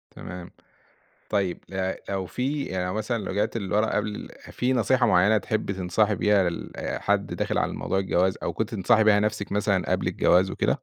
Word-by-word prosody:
تمام. 90 Hz, -1 st, -8 dB, 0.8 s
طيّب 95 Hz, -4 st, -1 dB
آآ 95 Hz, 0 st, -2 dB
لو 95 Hz, -1 st, -2 dB
في 140 Hz, +7 st, -2 dB
يعني 90 Hz, -1 st, -3 dB
لو 90 Hz, -, -3 dB
مثلًا 110 Hz, -1 st, -2 dB
رجعتِ 105 Hz, +4 st, -1 dB
لورا 105 Hz, +1 st, +1 dB
قبل 105 Hz, 0 st, -3 dB, 0.2 s
في 125 Hz, +1 st, 0 dB
نصيحة 130 Hz, +1 st, +3 dB
معيّنة 105 Hz, +5 st, +4 dB
تحبّي 110 Hz, -3 st, -2 dB
تنصحي 95 Hz, +3 st, +1 dB
بيها 100 Hz, -2 st, +3 dB
لحد 85 Hz, -, -2 dB
داخل -, -, -1 dB
على -, -, 0 dB
موضوع 95 Hz, -, -2 dB
الجواز 95 Hz, -1 st, +1 dB
أو -, -, -1 dB
كنتِ 110 Hz, +1 st, -3 dB
تنصحي 110 Hz, +2 st, +3 dB
بيها 105 Hz, -1 st, +5 dB
نفْسك 105 Hz, -1 st, -2 dB
مثلًا 100 Hz, -2 st, 0 dB
قبل -, -, 0 dB
الجواز 95 Hz, +2 st, +3 dB
وكده؟ -, -, 0 dB
105 Hz, 170 wpm, -25 LUFS, 95-110 Hz, 0.8 s, بيها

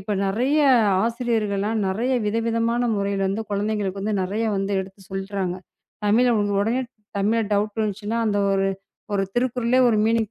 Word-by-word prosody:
இப்ப 200 Hz, +2 st, -4 dB
நெறைய 250 Hz, +10 st, +1 dB, 0.5 s
ஆசிரியர்கள்லாம் 225 Hz, -3 st, -1 dB
நெறைய 230 Hz, +7 st, -1 dB
விதவிதமான 230 Hz, +2 st, 0 dB, 0.2 s
முறையில 200 Hz, -1 st, 0 dB
வந்து 210 Hz, +3 st, -2 dB
குழந்தைகளுக்கு 205 Hz, -1 st, -1 dB
வந்து 210 Hz, +2 st, -1 dB
நெறைய 205 Hz, +5 st, -2 dB
வந்து 195 Hz, +1 st, -1 dB
எடுத்துச் 190 Hz, 0 st, -11 dB
சொல்றாங்க. 195 Hz, -1 st, -3 dB, 0.5 s
தமிழ் 240 Hz, +4 st, +4 dB
அவுங்க 205 Hz, -2 st, +1 dB
உடனே 230 Hz, +5 st, +1 dB, 0.4 s
தமிழ்ல 220 Hz, +3 st, +2 dB
டவுட் 210 Hz, +2 st, 0 dB
வந்ச்சுனா 210 Hz, +2 st, -3 dB
அந்த 205 Hz, -1 st, +1 dB
ஒரு 195 Hz, 0 st, +1 dB, 0.5 s
1 195 Hz, -, +2 dB
திருக்குறளே 245 Hz, 0 st, +1 dB
1 225 Hz, -, +2 dB
மீனிங் 225 Hz, -1 st, +1 dB
210 Hz, 145 wpm, -23 LUFS, 200-230 Hz, 0.5 s, தமிழ்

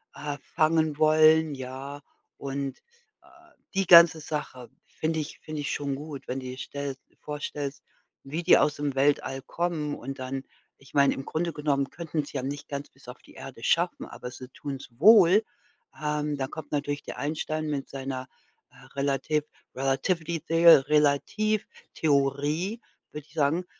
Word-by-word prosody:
äh, 145 Hz, -1 st, -4 dB
fangen 155 Hz, -1 st, +1 dB
wollen, 155 Hz, 0 st, +5 dB
ja. 135 Hz, +2 st, -7 dB, 0.4 s
Und, 140 Hz, -1 st, -4 dB, 0.4 s
äh, -, -, -23 dB, 0.5 s
die 195 Hz, -2 st, 0 dB
ganze 170 Hz, -2 st, +9 dB
Sache 140 Hz, -5 st, -5 dB, 0.2 s
finde 160 Hz, 0 st, -2 dB
ich 155 Hz, 0 st, -6 dB
finde 155 Hz, -1 st, -6 dB
ich 145 Hz, -, -2 dB
schon 140 Hz, -1 st, -2 dB
gut, 145 Hz, 0 st, -8 dB
wenn 130 Hz, -, -3 dB
die 130 Hz, 0 st, -7 dB
stell 140 Hz, +1 st, -5 dB
du -, -, -32 dB
vorstellst, 145 Hz, -1 st, -5 dB, 0.4 s
wie 155 Hz, +5 st, -4 dB
die -, -, +7 dB
aus 150 Hz, -1 st, +2 dB
dem 145 Hz, -2 st, -3 dB
Weltall 135 Hz, -1 st, +1 dB
kommen 155 Hz, 0 st, -2 dB
und 135 Hz, +2 st, -7 dB
dann 130 Hz, +1 st, -4 dB, 0.4 s
ich 135 Hz, -, -18 dB
meine, 140 Hz, -1 st, +4 dB
im 135 Hz, -, -7 dB
Grunde 170 Hz, +2 st, -2 dB
genommen 140 Hz, -2 st, 0 dB
könnten 165 Hz, -2 st, -3 dB
sie 145 Hz, -, -6 dB
ja 130 Hz, -, -3 dB
nicht 145 Hz, +2 st, -5 dB
ganz 140 Hz, 0 st, -5 dB
bis 135 Hz, -, -20 dB
auf 125 Hz, -, -10 dB
die -, -, -18 dB
Erde -, -, -10 dB
schaffen, -, -, +1 dB
aber 125 Hz, -, -8 dB
sie 130 Hz, +1 st, -9 dB
tun's 140 Hz, 0 st, -7 dB
wohl, 205 Hz, -, +7 dB, 0.6 s
ähm, 150 Hz, -1 st, -1 dB
da 135 Hz, -1 st, -2 dB
kommt 150 Hz, +1 st, -9 dB
natürlich 145 Hz, 0 st, -2 dB
der -, -, -8 dB
Einstein 155 Hz, +1 st, -2 dB
mit 140 Hz, -3 st, -3 dB
seiner, 130 Hz, -1 st, -5 dB, 0.4 s
äh, -, -, -17 dB
relativ 140 Hz, +2 st, 0 dB, 0.3 s
relativity 160 Hz, +6 st, 0 dB
theo 165 Hz, -1 st, +8 dB
Retativtheorie 150 Hz, -, 0 dB, 0.3 s
würde 150 Hz, 0 st, -8 dB
ich -, -, -23 dB
sagen, 160 Hz, +3 st, +1 dB
145 Hz, 160 wpm, -27 LUFS, 135-155 Hz, 0.6 s, ganze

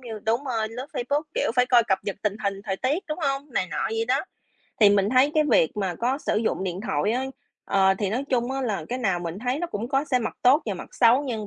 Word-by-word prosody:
như 230 Hz, -4 st, -7 dB
đúng 230 Hz, +5 st, +1 dB
rồi, 225 Hz, -5 st, -1 dB
lướt 245 Hz, +4 st, -7 dB
Facebook, 285 Hz, +5 st, -1 dB
kiểu, -, -, +1 dB
phải 250 Hz, 0 st, +4 dB
coi 245 Hz, -1 st, +5 dB
cập 190 Hz, -4 st, +1 dB
nhật 200 Hz, -, -3 dB
tình 210 Hz, -1 st, 0 dB
hình 200 Hz, 0 st, -2 dB
thời 195 Hz, -2 st, -2 dB
tiết, 280 Hz, -, -1 dB
đúng 305 Hz, +2 st, -3 dB
hông? 275 Hz, 0 st, -2 dB
Này 185 Hz, -, 0 dB
nọ 150 Hz, -, -1 dB
vậy 225 Hz, 0 st, -1 dB
đó. 260 Hz, +2 st, +3 dB, 0.6 s
Thì 210 Hz, -2 st, +8 dB
mình 200 Hz, -1 st, +3 dB
thấy 260 Hz, +3 st, +4 dB
cái 310 Hz, -1 st, +4 dB
việc 160 Hz, -, +3 dB
mà 190 Hz, -4 st, -1 dB
có 245 Hz, +9 st, -1 dB
sử -, -, -1 dB
dụng 215 Hz, -3 st, 0 dB
điện 185 Hz, 0 st, -3 dB
thoại 200 Hz, +1 st, 0 dB
á, 255 Hz, +2 st, -1 dB, 0.4 s
ờ, 190 Hz, -1 st, +3 dB
thì 200 Hz, -3 st, -1 dB
nói 250 Hz, +6 st, -1 dB
chung 245 Hz, -1 st, +1 dB
á 270 Hz, -, -2 dB
là 225 Hz, -6 st, -2 dB
cái 250 Hz, -, -2 dB
nào 195 Hz, -8 st, 0 dB
mình 170 Hz, +1 st, -5 dB
thấy 250 Hz, +4 st, -1 dB
nó 345 Hz, -, -2 dB
cũng 235 Hz, -8 st, -5 dB
có 270 Hz, +2 st, +1 dB
xe 270 Hz, -4 st, +1 dB
mặt 230 Hz, -, -4 dB
tốt 270 Hz, +5 st, +5 dB
và 205 Hz, -, -1 dB
mặt 180 Hz, -, -8 dB
xấu 240 Hz, +4 st, +5 dB
nhưng 225 Hz, -6 st, -4 dB
235 Hz, 270 wpm, -25 LUFS, 200-265 Hz, 0.6 s, Thì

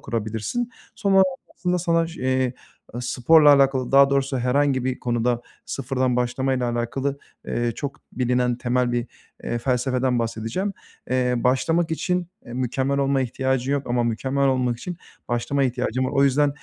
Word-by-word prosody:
kurabilirsin. 115 Hz, -, -3 dB, 0.2 s
Sonra 195 Hz, -1 st, +4 dB, 0.3 s
aslında 180 Hz, 0 st, -1 dB
sana 165 Hz, -1 st, +1 dB
ş 165 Hz, -3 st, -10 dB
eee, 130 Hz, -1 st, +1 dB, 0.4 s
ııı, 120 Hz, -, -4 dB
sporla 145 Hz, +5 st, +5 dB
alakalı 135 Hz, -2 st, +2 dB
daha 140 Hz, 0 st, +7 dB
doğrusu 135 Hz, -1 st, +1 dB
herhangi 130 Hz, +1 st, +1 dB
bir 130 Hz, -1 st, -1 dB
konuda 120 Hz, 0 st, 0 dB, 0.2 s
sıfırdan 130 Hz, -1 st, -1 dB
başlamayla 125 Hz, 0 st, 0 dB
alakalı, 135 Hz, +4 st, -2 dB, 0.3 s
eee, 120 Hz, -1 st, -1 dB
çok 140 Hz, -1 st, -5 dB
bilinen 125 Hz, -1 st, +1 dB
temel 125 Hz, 0 st, 0 dB
bir, 120 Hz, 0 st, -1 dB, 0.4 s
eee, 120 Hz, -, -2 dB
felsefeden 125 Hz, 0 st, 0 dB
bahsedeceğim. 115 Hz, -, -2 dB, 0.4 s
Eee, 125 Hz, -1 st, +2 dB
başlamak 160 Hz, +8 st, +1 dB
için, 180 Hz, +2 st, -1 dB, 0.2 s
eee, 120 Hz, -, -9 dB
mükemmel 130 Hz, +2 st, -1 dB
olma 135 Hz, -1 st, +2 dB
ihtiyacın 130 Hz, +1 st, -1 dB
yok 140 Hz, -1 st, -1 dB
ama 120 Hz, 0 st, +1 dB
mükemmel 135 Hz, +4 st, 0 dB
olmak 125 Hz, -2 st, 0 dB
için 175 Hz, +6 st, -6 dB, 0.3 s
başlamaya 130 Hz, +3 st, +1 dB
ihtiyacın 125 Hz, +1 st, -1 dB
var. 130 Hz, -, -1 dB
O 140 Hz, 0 st, +3 dB
yüzden, 145 Hz, +2 st, +3 dB
130 Hz, 150 wpm, -23 LUFS, 120-140 Hz, 0.4 s, daha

